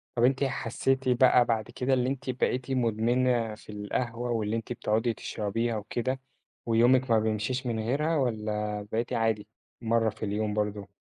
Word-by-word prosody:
طَب 120 - +1
أنتِ 130 +2 +3
حسّيتِ 135 -1 0
بقى 125 0 +5
بعد 110 -3 -1
كده 130 +1 0
اللي 125 -1 +2
أنتِ 135 0 -4
بقيتِ 130 +1 -1
مُدمِنة 120 -1 +1
في 105 - -13
القهوة 115 +4 -3
واللي 110 -1 0
أنتِ 115 +1 -3
بتقعٌدي 115 +1 0
تشرَبيها 110 +2 -2
وكده، 120 +5 -2 0.5
ويومِك 120 +2 +4
ما 110 - +5
بيمشيش 110 +4 -1
من 115 -2 -1
غيرها؟ 145 +9 0
والّا 105 -4 -1
بقيتِ 115 +2 -1
عادي 110 -2 0 0.3
مرّة 115 -1 +2
في 110 - -6
اليوم 105 +1 -1
برضه؟ 105 -1 -2
115 Hz, 160 wpm, -28 LUFS, 110-125 Hz, 0.5 s, بقى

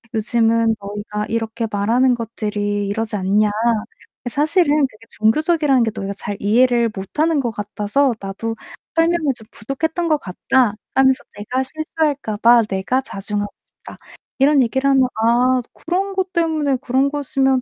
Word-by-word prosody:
"요즘은 225 0 +2
너희가 210 +1 -5
이렇게 225 0 -2
말하는 235 +5 +2
것들이 205 -3 -3
이러지 220 +1 -2
않냐. 205 +2 +2 0.7
이 - - -1
사실은 300 +3 +2
그게 225 -2 -19
종교적이라는 285 +3 +2
게 220 - 0
너희가 195 0 -4
잘 205 0 -4
이해를 235 +2 +3
못 195 +8 -8
하는 320 -1 +3
것 240 -4 -1
같아서 210 +6 0
나도 200 +4 -4 0.4
설명이 330 -4 +2
좀 220 - -14
부족했던 320 +9 -3
것 310 -2 +3
같다." 235 +3 +1 0.2
하면서 265 -1 +3
"내가 250 +6 -2
실수할까 295 -5 -2
봐 235 +2 +6
내가 210 +6 -1
자중하고 205 -2 -4 0.3
싶다." - - -11 0.4
이런 280 0 +5
얘기를 265 +4 0
하면 265 -2 +4 0.2
"아, 250 +2 +3
그런 385 +4 -2
것 375 -1 -2
때문에 315 -5 +1
그런 265 +1 +1
거였으면 270 -2 +1
240 Hz, 335 characters per minute, -19 LUFS, 210-280 Hz, 0.7 s, 봐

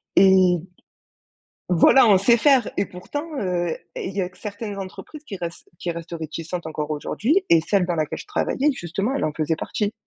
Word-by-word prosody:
et 185 -2 +6 1.1
voilà 185 +9 +6
on 200 - +7
sait 235 +5 +4
faire 260 -2 +4
et 200 - +2
pourtant, 290 - -6
heu, 175 -2 -1 0.3
et - - -4
il 195 - -8
y 195 - +1
a 180 - -2
certaines 205 +2 -6
entreprises 195 +10 -8
qui 200 - -6
restent 170 -2 -7
qui 175 - -3
restent 170 0 -6
réticentes 165 +2 -5
encore 155 -1 -4
aujourd'hui 245 - 0
et 165 - +7
celles 190 +3 +1
dans 175 -1 -1
laquelle 155 -2 -2
je - - -10
travaillais 300 -8 +1
justement 195 +4 -3
elle - - -1
en 155 - -1
faisait 160 0 0
partie. 205 +5 -2
185 Hz, 190 wpm, -23 LUFS, 170-215 Hz, 1.1 s, on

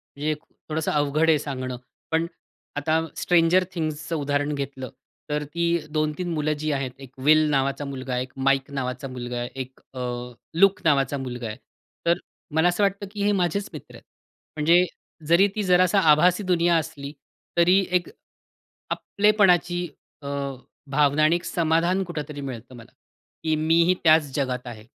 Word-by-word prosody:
म्हणजे 150 +2 -1 0.4
थोडंसं 155 0 -1
अवघड 150 +2 +2
आहे 155 -2 +4
सांगणं. 130 -3 -4 0.3
पण 160 +1 +2 0.5
आता 155 +2 +1 0.2
स्ट्रेंजर 175 +1 +4
थिंग्सचं 155 -1 -3
उदाहरण 145 0 0
घेतलं. 135 -2 -5 0.4
तर 150 0 -1
ती 170 +4 -2 0.2
2-3 155 +3 -1
मुलं 155 -1 0
जी 155 0 -1
आहेत, 135 -2 -2
एक 135 -2 -11
वेल 155 0 +5
नावाचा 140 0 0
मुलगा 135 -2 -5
आहे, 125 - 0
एक 130 - -13
माईक 135 +1 +1
नावाचा 130 -1 -3
मुलगा 125 -1 -5
आहे, 120 0 -3
एक 130 0 -7
अ, 130 - -7 0.6
लूक 195 0 +5
नावाचा 140 -2 +2
मुलगा 125 -3 -5
आहे. 110 - -6 0.5
तर 170 +1 +3 0.4
मला 160 +2 +4
असं 175 +4 0
वाटतं 200 0 0
की 205 -1 -3
हे 205 - +3
माझेच 195 +1 0
मित्र - - -10
आहेत. - - -14 0.5
म्हणजे 170 +4 +5 0.4
जरी 170 +5 +5
ती 215 - -1
जरासा 185 +1 +4
आभासी 180 +6 +4
दुनिया 175 -2 +2
असली. 150 -3 -5 0.4
तरी 180 +3 +5
एक 180 -1 +1 0.8
आपलेपणाची 180 -4 +2 0.4
अ, - - -8 0.6
भावना 145 +1 +3
आणि 155 +2 +5
एक 175 - -7
समाधान 170 +3 +1
कुठेतरी 150 -4 -6
मिळतं 130 -2 -7
मला, 115 -1 -13 0.5
की 160 -1 +2
मी 160 +2 +3
ही 180 +2 +3
त्याच 155 -3 +5
जगात 130 -3 -2
आहे. 110 -3 -9
155 Hz, 160 wpm, -24 LUFS, 135-175 Hz, 0.8 s, वेल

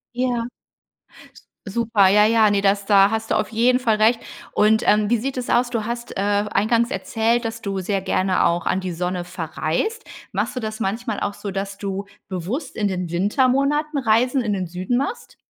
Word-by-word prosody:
Ja. 245 -2 -1 1.2
Super, 215 -2 +3
ja, 210 +2 +5
ja, 220 -2 +4
ne, 200 -1 +1
das 200 0 +1
da 200 -1 +5
hast 225 0 -3
du - - +3
auf - - 0
jeden 245 +3 +3
Fall 230 -4 +2
recht. 220 +2 +3 0.3
Und, 220 +2 +3
ähm, 210 0 +3
wie 240 - +3
sieht 265 +4 -3
es 250 -1 -4
aus? 240 +1 +2
Du 230 -3 -1
hast, 235 +2 -5
äh, - - -3
eingangs 210 +4 +1
erzählt, 230 -2 0
dass 225 0 -4
du 195 -2 -3
sehr 195 +1 -1
gerne 185 0 +1
auch 170 0 0
an 190 - +1
die 185 -1 -4
Sonne 180 +1 -3
verreist. 175 - -3 0.3
Machst - - -2
du - - -2
das 215 -2 -5
manchmal 225 +1 -2
auch 205 - -1
so, 200 - -7
dass 195 +1 -4
du 195 -1 -4 0.2
bewusst 190 - -4
in 210 - 0
den 180 -3 -3
Wintermonaten 275 - +1
Reisen 250 +1 +2
in 215 -3 -1
den 185 -2 -2
Süden 180 +7 -2
machst? 280 - -4
215 Hz, 195 wpm, -22 LUFS, 195-240 Hz, 1.2 s, ja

